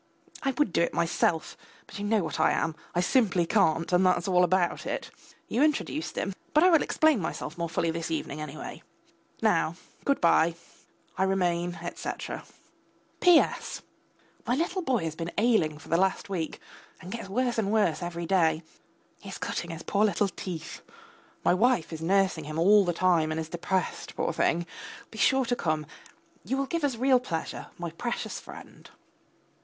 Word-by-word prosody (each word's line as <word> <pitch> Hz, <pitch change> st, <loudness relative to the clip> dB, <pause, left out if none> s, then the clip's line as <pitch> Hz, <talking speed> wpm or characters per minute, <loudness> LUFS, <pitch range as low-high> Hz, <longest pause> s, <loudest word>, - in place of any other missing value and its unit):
I 275 Hz, -, 0 dB
would 270 Hz, -, +1 dB
do -, -, +3 dB
it 170 Hz, -, 0 dB
myself, 165 Hz, -1 st, +1 dB, 0.3 s
but -, -, -9 dB
you 205 Hz, -, -3 dB
know 210 Hz, -2 st, +2 dB
what 160 Hz, -, -4 dB
I -, -, +4 dB
am, 165 Hz, -1 st, -1 dB, 0.2 s
I 175 Hz, -, +3 dB
simply 185 Hz, -4 st, +2 dB
can't, 165 Hz, -3 st, +2 dB
and 180 Hz, +1 st, +5 dB
that's 185 Hz, -1 st, +2 dB
all 180 Hz, -1 st, +4 dB
about 180 Hz, 0 st, +1 dB
it. -, -, -4 dB, 0.4 s
You 245 Hz, -, 0 dB
introduced 305 Hz, +1 st, 0 dB
him. 195 Hz, -, -2 dB, 0.2 s
But 305 Hz, -, +6 dB
I 365 Hz, -, +6 dB
will 325 Hz, -, +6 dB
explain 310 Hz, -6 st, +3 dB
myself 160 Hz, -1 st, -4 dB
more 170 Hz, -1 st, -3 dB
fully 165 Hz, 0 st, 0 dB
this 165 Hz, 0 st, -4 dB
evening, 155 Hz, -2 st, -3 dB
anyway. 155 Hz, 0 st, -7 dB, 0.6 s
Now -, -, +2 dB, 0.3 s
good 280 Hz, -, +1 dB
bye. 165 Hz, 0 st, +4 dB, 0.6 s
I -, -, +4 dB
remain, 175 Hz, -2 st, 0 dB
etc. -, -, -5 dB, 0.7 s
P.S. 355 Hz, -3 st, +3 dB, 0.6 s
My 245 Hz, -, +2 dB
little 345 Hz, +5 st, -1 dB
boy 260 Hz, -, 0 dB
has 160 Hz, -1 st, -2 dB
been 165 Hz, +1 st, -4 dB
ailing 215 Hz, -10 st, +2 dB
for 155 Hz, -, -14 dB
the 165 Hz, -, +3 dB
last 190 Hz, +2 st, +1 dB
week, 170 Hz, -5 st, -3 dB, 0.4 s
and 180 Hz, -, -9 dB
gets 230 Hz, -3 st, -6 dB
worse 245 Hz, +3 st, 0 dB
and 205 Hz, -2 st, 0 dB
worse 205 Hz, -8 st, +2 dB
every 170 Hz, -1 st, -4 dB
day; 165 Hz, -3 st, +2 dB, 0.6 s
he 195 Hz, -, -10 dB
is 190 Hz, -, -6 dB
cutting 170 Hz, -, -3 dB
his 165 Hz, 0 st, -6 dB
poor 205 Hz, +1 st, +1 dB
little 205 Hz, -1 st, +1 dB
teeth. 170 Hz, -2 st, -7 dB, 0.6 s
My -, -, +5 dB
wife 185 Hz, -5 st, +2 dB
is 160 Hz, -, -6 dB
nursing 185 Hz, -2 st, +2 dB
him 155 Hz, +1 st, -5 dB
all 200 Hz, +4 st, +6 dB
the 175 Hz, -, +1 dB
time, 170 Hz, -2 st, +2 dB
and 155 Hz, 0 st, -2 dB
is 160 Hz, 0 st, -4 dB
depressed, 180 Hz, +2 st, -2 dB
poor -, -, -1 dB
thing. 170 Hz, +1 st, +1 dB, 0.5 s
Be 220 Hz, -, -9 dB
sure 265 Hz, +5 st, +4 dB
to 245 Hz, -, 0 dB
come, 155 Hz, -7 st, -1 dB, 0.6 s
you 265 Hz, -, -2 dB
will 275 Hz, -, 0 dB
give 335 Hz, +3 st, -3 dB
us 280 Hz, -4 st, +1 dB
real 255 Hz, +2 st, +4 dB
pleasure, 165 Hz, -10 st, -4 dB
my 170 Hz, -1 st, -5 dB
precious 235 Hz, +8 st, -4 dB
friend. -, -, -12 dB
180 Hz, 180 wpm, -28 LUFS, 165-225 Hz, 0.7 s, But